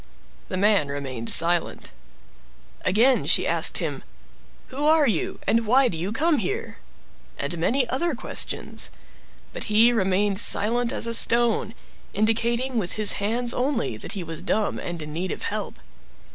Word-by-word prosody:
The 185 - -3
man 200 -6 +2
remained 135 -5 -6
silent. 170 0 +2 0.9
Again 240 +7 +3
she - - +4
asked - - +1
him— - - -4 0.7
"Who 285 +3 -2
are 310 -2 +4
you, 210 -9 -2
and 230 -1 +1
why 255 +3 +4
do 175 - -5
you 175 +5 -4
come 305 +5 +1
here?" 195 - -4 0.6
And 140 +5 -4
many 245 +9 +1
other 285 +5 -1
questions. - - -3 0.6
But - - -5
he 225 +3 +4
remained 195 -1 0
silent 235 +2 +2
as - - 0
a 230 - -1
stone, 230 -1 +3 0.4
indicating 235 +4 0
with 180 -4 -2
his 215 -1 +3
hands 235 +4 0
only 250 - -1
that 110 - -7
he 195 - -5
was 165 -1 -8
dumb 215 -1 -1
and 175 -1 -6
in 150 0 -8
need 180 +4 -3
of - - -5
help. - - -4
220 Hz, 155 wpm, -24 LUFS, 185-245 Hz, 0.9 s, she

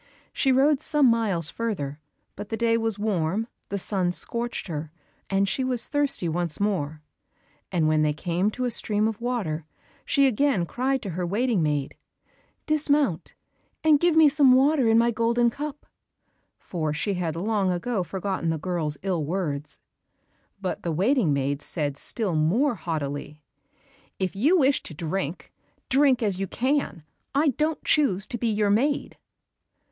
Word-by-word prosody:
She 270 - +2
rode 275 +2 +3
some 300 -2 +2
miles 215 -9 +2
further, 170 -11 -3 0.4
but 205 +1 -8
the 225 - -2
day 230 0 +2
was 225 -2 -1
warm, 205 -1 -1 0.2
the 200 - -2
sun 185 -2 0
scorched 235 +6 -2
her, 155 -3 -5 0.4
and 195 0 +2
she 260 - -1
was 250 -2 -1
thirsty 285 - +1
once 170 -1 -2
more, 160 -7 -1 0.7
and 165 -4 +1
when 155 0 +3
they 150 0 +2
came 175 +6 -1
to 250 +4 -3
a 245 - -1
stream 210 -1 0
of 220 0 -4
water, 215 -11 -2 0.4
she 280 -2 +3
again 260 -6 +2
cried 260 +7 -1
to 195 - -4
her 180 +2 -3
waiting 220 +1 +1
maid, 145 -3 -1 0.7
"Dismount, 290 - +1 0.5
and 310 -2 +5
give 345 0 +3
me 320 -1 +7
some 280 -3 +5
water 270 0 +4
in 225 - +5
my 235 +1 +4
golden 235 +1 +2
cup," 295 +2 -6 0.7
for 155 -4 -3
she 200 +7 -1
had 170 -4 -2
long 200 +2 0
ago 190 +4 -1
forgotten 185 0 -3
the 160 - 0
girl's 155 -3 -3
ill 180 -5 -1
words. 150 -3 -3 0.8
But 190 -2 -3
the 170 - -2
waiting 195 - +2
maid 140 +1 -1
said 145 -4 -3
still 200 +5 -2
more 195 - +2
haughtily, 150 -4 -5 0.7
"If 190 -1 -2
you 295 - +3
wish 275 -3 +3
to 160 - -6
drink, 165 +1 -4 0.4
drink 270 -3 +4
as 200 -4 0
you 195 - -2
can, 260 - -1 0.3
I 295 +2 +4
don't 305 +4 -1
choose 215 -10 +2
to 240 - -5
be 235 - 0
your 210 -2 +1
maid." 275 +7 0
205 Hz, 160 wpm, -25 LUFS, 165-255 Hz, 0.8 s, me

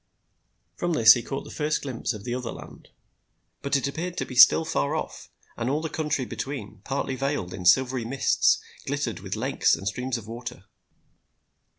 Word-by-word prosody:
From 175 -1 -1
this 110 -7 +8
he 120 - -2
caught 135 +4 -5
the - - -11
first 150 0 -1
glimpse 130 -4 -3
of 105 -4 -7
the 120 - -3
other 125 -2 -4
land. - - -12 0.7
But 140 - 0
it 135 - -1
appeared 170 +5 -4
to - - -1
be - - -9
still 125 +6 +7
far 160 -2 0
off, 155 - -5 0.3
and 120 +1 -2
all 145 +3 +1
the 160 -1 -5
country 150 -4 -1
between, 110 -4 -6
partly 135 -1 -2
veiled 135 -9 -2
in 90 -1 -7
silvery 130 +5 +4
mists, 130 +4 +2 0.3
glittered - - -2
with - - -5
lakes - - +2
and 95 - -7
streams 125 +3 -2
of 115 - -9
water. 120 -3 -8
130 Hz, 185 wpm, -26 LUFS, 115-145 Hz, 0.7 s, this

